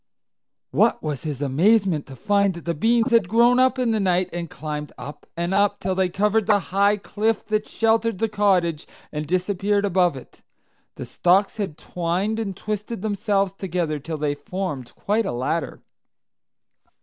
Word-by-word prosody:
What - - +2
was 150 -4 -3
his 145 -2 -3
amazement 175 +3 +2
to 135 - -10
find 200 +1 +1
that 170 - -10
the 170 - 0
beans 230 - +2
had 225 -7 +3
grown 240 +3 +4
up 260 0 +3
in 250 -2 +1
the 220 - +1
night, 185 -2 +1
and 170 -1 -4
climbed 150 -1 -5
up 145 - -9
and 170 +2 -1
up 200 +1 +2
till 190 - -1
they 185 -1 +1
covered 210 +3 +1
the 210 -2 +5 0.2
high 200 +1 +4
cliff 210 +3 -1
that 215 0 0
sheltered 225 -1 +1
the 225 - 0
cottage, 185 -7 +1 0.2
and 150 0 -4
disappeared 200 +3 0
above 180 -6 +2
it! 130 - -14 0.5
The - - -6
stalks 190 +5 +2
had 190 -8 -3
twined 180 +6 -2
and—twisted 210 +1 -4
themselves 200 -2 0
together 175 -6 -2
till 160 +3 -5
they 150 -1 0
formed 145 -3 -5
quite 215 +1 0
a - - -1
ladder. 130 +7 -3
190 Hz, 165 wpm, -23 LUFS, 170-210 Hz, 0.5 s, the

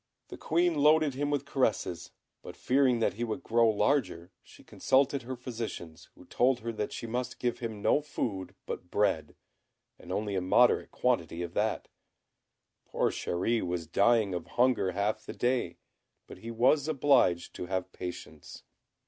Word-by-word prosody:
The - - -8
Queen 175 +2 +1
loaded 150 0 +4
him 145 +2 -2
with 145 -1 -1
caresses; 115 -10 -1 0.3
but - - -10
fearing 130 -2 +2
that 110 - +2
he 115 +5 -4
would 120 +4 -4
grow 115 0 +3
larger, 105 - 0
she - - -18
consulted 135 +1 +1
her 130 +2 -6
physicians, 110 -10 -7
who - - -16
told 125 -1 +1
her 115 +1 -3
that 105 -2 -4
she - - -6
must 120 +2 -3
give 120 -1 -2
him 110 -4 -6
no 150 - +3
food 100 -10 -4
but 90 - -6
bread, 80 -8 0 0.6
and - - -10
only 105 -1 -2
a 95 - 0
moderate 120 +7 +3
quantity 85 -9 -1
of 85 -1 -7
that. 110 +3 -1 1.0
Poor - - -1
Chéri 110 +7 -1
was 90 -2 -3
dying 100 +4 +2
of 90 -2 -4
hunger 125 -6 +1
half 105 +3 -1
the - - -7
day, 120 -8 -1 0.5
but - - -12
he 115 - -8
was 130 +6 +2
obliged 135 - +2
to 90 - -6
have 95 0 -3
patience. 90 -1 -8
115 Hz, 165 wpm, -29 LUFS, 95-130 Hz, 1.0 s, loaded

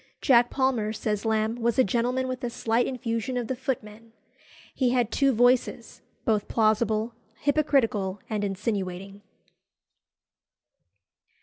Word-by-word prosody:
"Jack 245 -3 +4
Palmer," 255 -6 0
says 210 -1 -2
Lamb, 220 +1 0
"was 235 -1 0
a 260 - +6
gentleman 245 +4 0
with 255 0 -5
a 245 - -1
slight 230 +1 0
infusion 245 -1 -3
of 245 - -1
the 260 - -3
footman." 230 -3 -5 0.6
He 255 -2 +1
had 245 -2 +1
two 275 -1 +3
voices, 245 -1 +1 0.2
both 215 -2 +1
plausible, 220 0 +1 0.3
hypocritical, 255 -10 +1
and 210 -2 -2
insinuating. 195 -1 -3
230 Hz, 120 wpm, -26 LUFS, 215-250 Hz, 0.6 s, a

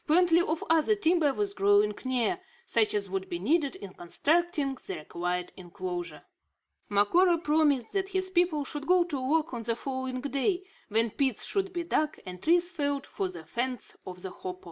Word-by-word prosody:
Plenty 340 +1 +5
of 325 -1 -1
other 325 +6 +3
timber 335 -6 +3
was 205 -5 -1
growing 205 +1 +3
near, 255 +8 0 0.3
such 225 - +3
as 200 -1 0
would 190 0 -4
be 175 - -2
needed 285 - +1
in 195 -2 -9
constructing 295 - +1
the - - -3
required 175 +3 -3
inclosure. 175 -3 -6 0.7
Macora 340 - +4
promised 300 -6 +1
that 385 -1 -1
his 375 -1 -1
people 345 -5 +2
should 290 +1 -5
go 360 0 +5
to 300 -6 -4
work 305 +3 +1
on 235 - -3
the 230 0 -1
following 260 0 -4
day; 285 +7 0 0.2
when 225 +1 +1
pits 265 -3 0
should 390 -1 -1
be 345 -1 -3
dug 310 -2 0
and 180 -1 -8
trees 345 +2 +3
felled 285 -4 -1
for 190 - -3
the 170 -3 -9
fence 245 +7 -3
of 180 0 -8
the 190 - -5
hopo. 185 0 -7
270 Hz, 180 wpm, -29 LUFS, 200-335 Hz, 0.7 s, Plenty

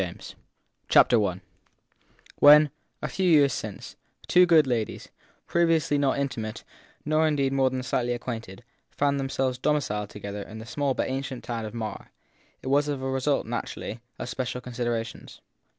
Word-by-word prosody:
THE 95 - -1 0.8
THIRD - - +6
PERSON 100 -6 +1 1.0
WHEN, 150 0 +8 0.3
a - - 0
few 190 -2 0
years 145 -5 +5
since, - - -6 0.3
two 180 0 +5
good 160 -3 +6
ladies, 120 -5 -3 0.4
previously 165 -4 +2
not 140 -1 +1
intimate 120 -6 -3 0.4
nor 155 +1 +3
indeed 140 -3 +1
more 135 -1 +3
than 130 0 -4
slightly 120 0 0
acquainted, 120 -3 -6 0.3
found 140 -1 0
themselves 135 -1 -1
domiciled 125 -8 0
together 100 0 -7
in 110 +2 -9
the 110 - -8
small 140 +2 -1
but - - -1
ancient 130 -1 -4
town 115 -2 -4
of 110 - -7
Marr, 110 -2 -5 0.5
it - - -7
was 145 +2 +2
as 145 - 0
a 130 - -5
result, 135 +2 0
naturally, 115 - -5 0.2
of - - -5
special 125 0 -3
considerations. 120 -2 -4
130 Hz, 155 wpm, -26 LUFS, 115-145 Hz, 1.0 s, WHEN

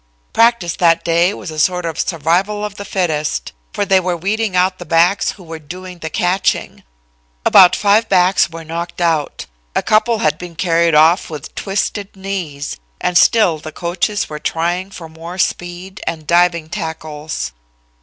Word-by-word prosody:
Practice 230 -7 +3
that 165 -2 +3
day 170 +2 +3
was 175 - -7
a 155 - -6
sort 180 +2 +1
of 165 -2 -4
survival 185 +6 0
of 210 - -5
the 200 0 -8
fittest, 160 -6 -1 0.2
for 205 - -1
they 190 -1 +4
were 180 -1 -2
weeding 205 +3 -1
out 185 +1 +2
the - - -6
backs, 175 +3 +2
who 190 - -15
were 165 -1 -8
doing 180 +4 -9
the 160 - -5
catching. 180 +4 0 0.6
About 180 -2 +7
five 210 +2 +3
backs 185 -1 +3
were 165 0 -8
knocked 170 +2 -5
out. 165 -4 0 0.3
A - - +1
couple 220 +2 +2
had 230 - 0
been 175 -2 -9
carried 170 -1 +2
off, 160 +4 +4
with 150 -4 -8
twisted 200 0 -3
knees, 185 -7 -5 0.2
and 180 - -1
still 175 -3 +4
the 155 +1 -8
coaches 180 +5 -2
were 150 0 -7
trying 175 +5 -1
for 175 -4 -9
more 165 +3 -9
speed 180 +1 -3
and 160 -2 -3
diving 170 -1 +2
tackles. 155 - -5
175 Hz, 165 wpm, -17 LUFS, 165-195 Hz, 0.6 s, About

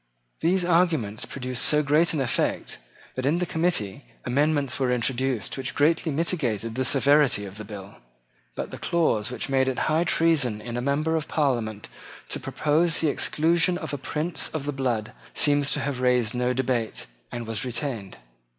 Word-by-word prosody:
These 180 +2 +2
arguments 165 - +1
produced 130 -2 -3
so 150 0 +4
great 150 +4 +3
an 155 - -1
effect 130 - -1 0.3
that 130 - -4
in 155 +4 +2
the 180 - 0
committee 160 - -1 0.2
amendments 145 +1 +1
were 130 -2 +1
introduced 125 -1 -1
which 130 - -3
greatly 160 +2 +2
mitigated 135 - -1
the 130 +3 -1
severity 140 -4 +3
of 100 +1 -9
the - - -5
bill. 100 -1 -9 0.6
But - - -4
the - - -7
clause 125 -11 +1
which 125 - -3
made 135 -1 +2
it 130 - -1
high 160 +2 +2
treason 155 -11 +2
in 115 +2 -6
a 120 - -1
member 150 +5 0
of 160 -2 -2
Parliament 120 -8 -1 0.4
to - - -1
propose 160 +2 +1
the 160 - +1
exclusion 170 +5 +2
of 160 -4 -5
a - - -1
prince 155 +6 -2
of 155 -3 -4
the 145 - -2
blood 120 -5 -1 0.2
seems 145 -1 +3
to - - -1
have 135 -2 -3
raised 125 -3 +2
no 125 0 0
debate, 125 -3 -1 0.3
and 120 - -5
was 110 -2 -1
retained. 120 - -4
135 Hz, 175 wpm, -25 LUFS, 120-155 Hz, 0.6 s, so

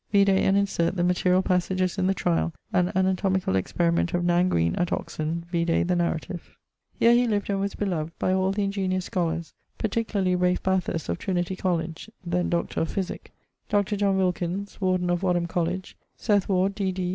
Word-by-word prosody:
Vide 200 -1 +5
and 190 0 +3
insert 195 -3 +1
the 175 - 0
materiall 180 +1 +2
passages 185 +1 0
in 185 - +2
the 195 - +2
tryal, 80 - 0 0.2
and 180 -1 +3
anatomicall 190 - +1
experiment 170 - +1
of 175 0 0
Nan 175 +1 +3
Green 85 - +1
at 175 - 0
Oxon: 165 +2 -3
vide 170 -1 +1
the 180 - +2
narrative. 175 0 -3 0.4
Here 235 - +6
he 245 0 +4
lived 205 -2 0
and 195 - 0
was 200 0 -2
beloved 165 -5 -3
by 185 - +1
all 190 0 +2
the 205 +1 -1
ingeniose 190 -2 -1
scholars, 170 -2 -2 0.2
particularly 205 -4 0
Ralph 180 0 +1
Bathurst 185 -4 0
of 85 - -2
Trin. 175 -2 0
Coll. 180 -3 0 0.4
(then 175 +1 0
Dr. 170 0 -1
of 165 - -1
Physique); 190 -2 -4 0.4
Dr. 205 0 +1
John 200 -1 +1
Wilkins 185 +2 -2
(Warden 185 -1 +1
of 175 0 0
Wadham 175 -2 +1
Coll.); 170 -1 0 0.5
Seth 205 -3 +1
Ward, 190 +1 +2
D.D. 190 -3 -2
185 Hz, 180 wpm, -26 LUFS, 175-195 Hz, 0.5 s, Here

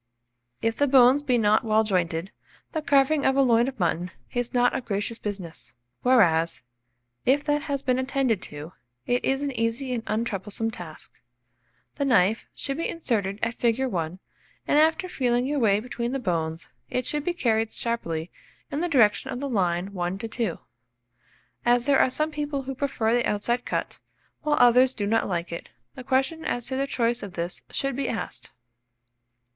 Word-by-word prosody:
If 225 0 0
the 285 - +3
bones 260 +1 +6
be 255 -4 +1
not 215 -1 +3
well 220 -1 +3
jointed, 180 -3 -1 0.4
the 315 - -2
carving 280 0 +3
of 265 - +3
a 275 - +5
loin 235 -1 +4
of 265 -3 -6
mutton 175 0 0 0.2
is 245 -1 -1
not 245 0 +3
a - - -1
gracious 210 0 -3
business; 185 - -6 0.3
whereas, 170 - +3 0.6
if 280 +3 +3
that 295 0 +1
has 280 -1 -1
been 255 -1 +1
attended 260 -6 0
to, 150 +4 -9 0.3
it 245 0 +1
is 270 +1 0
an 285 - -1
easy 240 +2 -1
and 235 -2 -3
untroublesome 215 0 -2
task. 170 -7 -10 0.8
The 280 - 0
knife 220 -4 +3
should 275 0 -3
be 330 - -1
inserted 210 - -1
at 230 - +1
fig. 235 0 +1
1, 175 -7 -2 0.5
and 295 - +4
after 320 +4 +3
feeling 250 -7 +1
your 290 +1 0
way 205 -4 +3
between 240 +1 -4
the - - 0
bones, 165 -6 -2 0.2
it 250 -1 -1
should 295 +2 -2
be 345 +2 -1
carried 225 -7 +1
sharply 170 -9 -3 0.4
in 285 - -2
the 350 - 0
direction 235 -9 +3
of 245 - -4
the 280 - -3
line 190 -4 0
1 180 0 -2
to 225 +3 -5
2. 225 -5 -2 1.1
As 240 0 +3
there 280 -1 +4
are - - +4
some 305 +4 -1
people 295 -2 -3
who 270 +1 -4
prefer 255 -4 0
the 240 0 +2
outside 235 +4 -1
cut, - - -3 0.4
while 300 -1 +1
others 250 +2 +6
do 205 - -2
not 225 +2 +1
like 175 -2 -2
it, 170 - -6 0.2
the 255 - -9
question 270 +5 0
as 245 -5 -2
to 260 - -3
their 275 +1 0
choice 235 -2 0
of 200 -3 -7
this 170 +1 -4
should 275 -2 -2
be 275 0 -2
asked. 225 - -5
240 Hz, 185 wpm, -26 LUFS, 205-270 Hz, 1.1 s, bones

